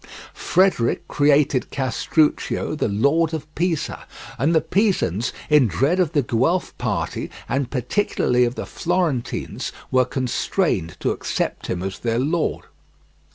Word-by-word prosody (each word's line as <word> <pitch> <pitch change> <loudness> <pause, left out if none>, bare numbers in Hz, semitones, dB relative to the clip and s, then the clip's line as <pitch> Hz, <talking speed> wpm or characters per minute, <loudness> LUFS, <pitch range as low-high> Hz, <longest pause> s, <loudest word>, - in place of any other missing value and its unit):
Frederick 185 -11 +1
created 145 -2 +2
Castruccio 135 +6 0
the 155 - 0
lord 145 +10 +2
of 155 -2 -5
Pisa, 170 -3 -2 0.3
and 155 +7 +2
the - - +6
Pisans, 170 - +1 0.2
in 150 -5 +5
dread 135 - +1
of 170 -4 +1
the 145 -3 +2
Guelph 130 +11 0
party, - - -2 0.2
and 135 -2 -1
particularly 125 - +1
of 120 +1 0
the - - -4
Florentines, 170 -8 -2 0.2
were 130 -1 +4
constrained 125 - -1
to - - +1
accept - - -3
him 90 0 -3
as 95 0 -4
their 115 -1 -1
lord. 155 +6 0
140 Hz, 130 wpm, -22 LUFS, 120-165 Hz, 0.3 s, the